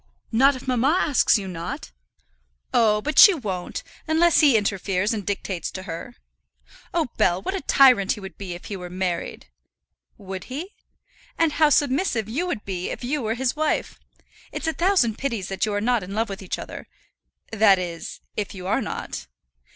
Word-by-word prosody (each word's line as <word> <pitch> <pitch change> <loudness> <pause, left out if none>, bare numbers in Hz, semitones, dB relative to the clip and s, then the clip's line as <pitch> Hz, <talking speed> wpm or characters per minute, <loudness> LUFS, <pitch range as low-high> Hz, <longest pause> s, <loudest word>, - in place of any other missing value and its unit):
"Not 270 +5 +4
if 255 - -10
mamma 260 +6 +2
asks 280 -5 +3
you 195 -2 -5
not?" 170 - -6 0.8
"Oh, 210 -2 +3
but 305 - +1
she 400 - +10
won't, 195 - -4 0.2
unless 330 +1 +4
he 285 -7 +6
interferes 200 0 0
and 210 -2 -3
dictates 190 -2 -3
to 185 - -6
her. 185 +9 -7 0.8
Oh, 330 -6 0
Bell, 175 0 +3
what 380 - -4
a 390 - -3
tyrant 255 -8 +5
he - - -8
would 190 -1 -9
be 185 -3 -6
if 175 - -11
he 205 - -5
were 180 -2 -7
married!" 180 - -4 0.7
"Would 190 -1 -7
he?" 315 +10 -6 0.6
"And 330 -2 +3
how 310 0 +4
submissive 280 - +1
you 290 +11 -2
would 265 -12 -4
be, 185 -2 -3
if - - -6
you 280 +4 -1
were 220 -1 -1
his 255 +2 -1
wife! 310 0 -1 0.5
It's - - -5
a 320 - 0
thousand 325 - +2
pities 230 -9 -3
that 195 +2 -1
you 210 - -2
are - - +1
not 240 +2 +1
in 195 +2 -7
love 225 0 0
with 195 0 -6
each 190 - -4
other; - - -8 0.6
that 215 -3 +5
is, 175 -2 -6
if 205 -1 -4
you 185 -1 -8
are 215 +8 +1
not." 205 - -5
220 Hz, 185 wpm, -24 LUFS, 190-275 Hz, 0.8 s, she